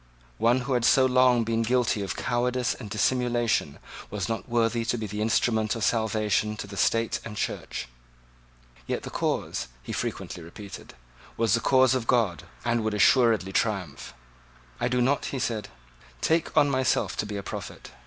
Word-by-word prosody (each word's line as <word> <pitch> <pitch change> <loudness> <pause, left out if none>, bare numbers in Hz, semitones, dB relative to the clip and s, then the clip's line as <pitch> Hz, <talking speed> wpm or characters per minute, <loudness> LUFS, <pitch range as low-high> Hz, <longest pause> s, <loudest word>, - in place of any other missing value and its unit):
One 120 +3 +3
who 130 +2 -2
had 120 -2 +1
so 130 +2 +5
long 125 -2 +4
been 115 0 0
guilty 120 -2 +1
of 95 -2 -3
cowardice 125 +1 0
and 110 -5 -9
dissimulation 120 - +1 0.3
was 100 -2 -3
not 115 +2 -4
worthy 115 0 +1
to 120 - -1
be 110 - -4
the 105 +1 -4
instrument 110 0 +1
of 115 - -3
salvation 110 -1 +1
to - - -5
the 100 0 -9
State 115 +4 +1
and 105 -2 -8
Church. - - -3 1.0
Yet - - -2
the - - -7
cause, 65 - -2 0.2
he - - -6
frequently 90 - -4
repeated, 100 +4 -10 0.4
was 115 -3 +2
the 115 - +4
cause 130 +2 +4
of 125 -3 -1
God, 110 - +1 0.2
and 120 -1 +1
would 110 -1 -1
assuredly 105 -3 +4
triumph. 95 - -2 0.6
"I - - +1
do 125 0 +1
not," 135 +3 +1
he 140 - -3
said, 115 -4 -2 0.5
"take 165 - 0
on 145 - +6
myself 130 -2 +1
to 105 - -1
be 105 -1 -4
a 100 - -5
prophet. - - -7
115 Hz, 175 wpm, -26 LUFS, 105-125 Hz, 1.0 s, on